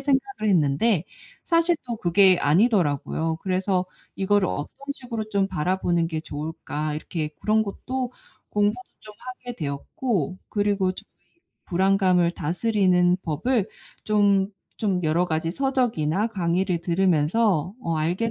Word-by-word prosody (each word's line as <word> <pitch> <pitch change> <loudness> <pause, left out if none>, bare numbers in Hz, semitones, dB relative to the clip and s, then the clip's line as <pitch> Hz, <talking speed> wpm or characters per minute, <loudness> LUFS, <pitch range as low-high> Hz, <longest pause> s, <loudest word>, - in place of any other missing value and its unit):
생각을 270 - 0
했는데 170 +3 +2 0.4
사실 335 0 +3
또 235 -2 -3
그게 185 0 +4
아니더라고요. 160 - +2
그래서 185 0 0 0.3
'이거를 195 -1 +2
어떤 145 - -4 0.2
식으로 230 -5 -5
좀 200 -2 +2
바라보는 175 -1 0
게 160 -2 -3
좋을까?' 150 0 -4
이렇게 155 0 -3
그런 220 +1 +2
것도 250 +5 -4 0.4
공부도 210 +4 +1 0.2
좀 210 -1 -13
하게 250 -1 -8
되었고 165 - -2
그리고 205 -3 +1
좀 - - -11 0.6
이 - - -33
불안감을 185 -1 +3
다스리는 180 0 +2
법을 200 - 0 0.4
좀 200 -2 +3 0.3
좀 190 -5 0
여러 165 +3 +2
가지 160 0 -1
서적이나 225 - 0
강의를 180 -2 0
들으면서 180 +1 +2
어 165 -7 -1
알게 180 +9 0
190 Hz, 290 characters per minute, -24 LUFS, 165-215 Hz, 0.6 s, 그게